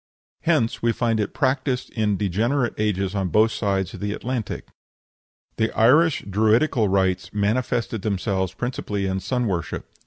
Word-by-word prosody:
Hence 150 -9 +1
we 115 0 +2
find 115 -2 0
it 105 - -1
practised 130 -2 -1
in 105 -3 0
degenerate 115 +7 0
ages 100 -3 0
on 100 -2 -1
both 110 +6 +3
sides 95 -4 -1
of - - -8
the 105 0 -2
Atlantic. 120 -2 -4 0.9
The 110 0 +1
Irish 150 +8 +4
Druidical 110 +4 +2
rites 95 -1 +1
manifested 115 +1 0
themselves 95 -2 -1
principally 105 -4 -3
in 95 0 -1
sun 125 +6 -1
worship. 90 -7 -3
110 Hz, 145 wpm, -23 LUFS, 95-125 Hz, 0.9 s, Irish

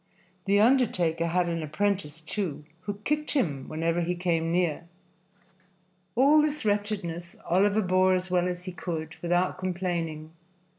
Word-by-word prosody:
The 200 +1 +3
undertaker 195 -9 +3
had 175 +1 +1
an 165 -1 -2
apprentice, 165 0 -1
too, 165 -3 -4 0.2
who 205 - -3
kicked 300 +3 0
him 150 - -1
whenever 165 +2 0
he 175 +1 -1
came 165 -2 0
near. 170 -2 0 1.3
All 285 +5 +6
this 300 -3 -1
wretchedness 200 -5 -2
Oliver 200 +4 +3
bore 185 0 +3
as 185 0 -3
well 180 -1 +2
as 180 0 -4
he 185 - -5
could, 160 -3 -5
without 175 +1 +1
complaining. 170 -4 -3
180 Hz, 140 wpm, -27 LUFS, 165-205 Hz, 1.3 s, All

